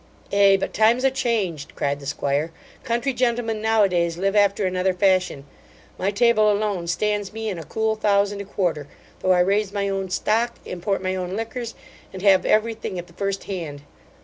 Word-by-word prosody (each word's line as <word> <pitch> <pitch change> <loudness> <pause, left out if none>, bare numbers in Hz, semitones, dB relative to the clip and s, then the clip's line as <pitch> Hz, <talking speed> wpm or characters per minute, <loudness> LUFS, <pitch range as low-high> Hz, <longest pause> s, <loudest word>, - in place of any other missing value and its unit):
'Ay; 200 -1 +6
but - - -3
times 230 +4 +3
are 270 - +4
changed 195 - -2
(cried 140 0 -1
the 140 - -9
'squire) 145 +2 -1 0.3
Country 240 +4 -1
gentlemen 235 -3 0
now 220 -1 +3
a 195 - +3
days 170 -2 0
live 195 +3 0
after 200 0 +3
another 185 0 0
fashion. 185 -7 +1 0.5
My 190 - +1
table 215 0 +4
alone 205 -4 -1
stands 205 +3 -1
me 220 0 -4
in 185 -4 -4
a - - -7
cool 220 +6 -1
thousand 205 -1 +1
a - - -7
quarter, 175 -7 -2 0.3
though 185 - +3
I 180 - +4
raise 200 +2 +1
my 200 -1 -1
own 195 -1 -2
stock, 230 +5 0
import 190 +2 -3
my 185 0 -1
own 185 0 -3
liquors, 230 +1 -5 0.4
and 190 0 -8
have 195 -2 +5
every 220 +2 +3
thing 215 -4 -6
at 175 - -5
the 170 - -20
first 195 +1 -3
hand. 160 -7 -6
200 Hz, 195 wpm, -23 LUFS, 180-215 Hz, 0.5 s, Ay